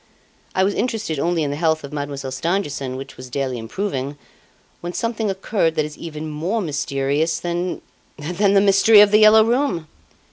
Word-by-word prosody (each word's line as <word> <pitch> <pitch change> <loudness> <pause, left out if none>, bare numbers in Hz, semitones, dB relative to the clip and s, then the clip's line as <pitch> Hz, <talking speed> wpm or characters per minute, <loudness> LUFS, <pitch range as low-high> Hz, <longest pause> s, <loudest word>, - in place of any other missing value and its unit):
I 190 - +3
was 200 +1 +1
interested 225 - -2
only 170 +1 0
in 145 - -1
the - - -3
health 160 0 0
of 140 - -9
Mademoiselle 140 -2 -4
Stangerson, 140 -3 -2
which 135 +1 -9
was 130 0 -10
daily 130 -1 -2
improving, 140 - -4 0.6
when 175 +1 -6
something 225 -1 -2
occurred 190 -3 0
that 155 - +1
is 150 0 -8
even 155 -1 -7
more 165 +9 -2
mysterious 150 -1 -1
than 175 +1 -3 0.3
than 180 +7 0
the 195 - +6
mystery 200 +2 +6
of 205 -1 +5
"The 210 - +6
Yellow 215 0 +7
Room"!" 235 - 0
165 Hz, 175 wpm, -21 LUFS, 145-200 Hz, 0.6 s, Yellow